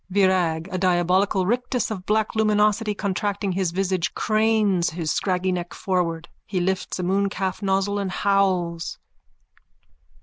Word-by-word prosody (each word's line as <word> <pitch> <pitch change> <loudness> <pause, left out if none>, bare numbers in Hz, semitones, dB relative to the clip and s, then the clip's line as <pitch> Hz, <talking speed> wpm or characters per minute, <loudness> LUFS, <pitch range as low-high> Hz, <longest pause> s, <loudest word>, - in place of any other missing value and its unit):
VIRAG: 185 -4 +2
_(A 185 - -3
diabolic 185 +2 +2
rictus 240 +6 0
of 190 -4 -6
black 215 0 +1
luminosity 210 0 +2
contracting 200 0 -2
his 185 -1 0
visage, 185 -1 -1
cranes 215 -5 +2
his 160 0 -3
scraggy 185 -1 0
neck 175 -1 -4
forward. 175 -3 -1 0.2
He 185 - -1
lifts 185 +1 -1
a 180 - -3
mooncalf 195 +1 -1
nozzle 195 +1 0
and 195 -1 -2
howls.) 185 -3 0
190 Hz, 130 wpm, -23 LUFS, 180-205 Hz, 0.2 s, VIRAG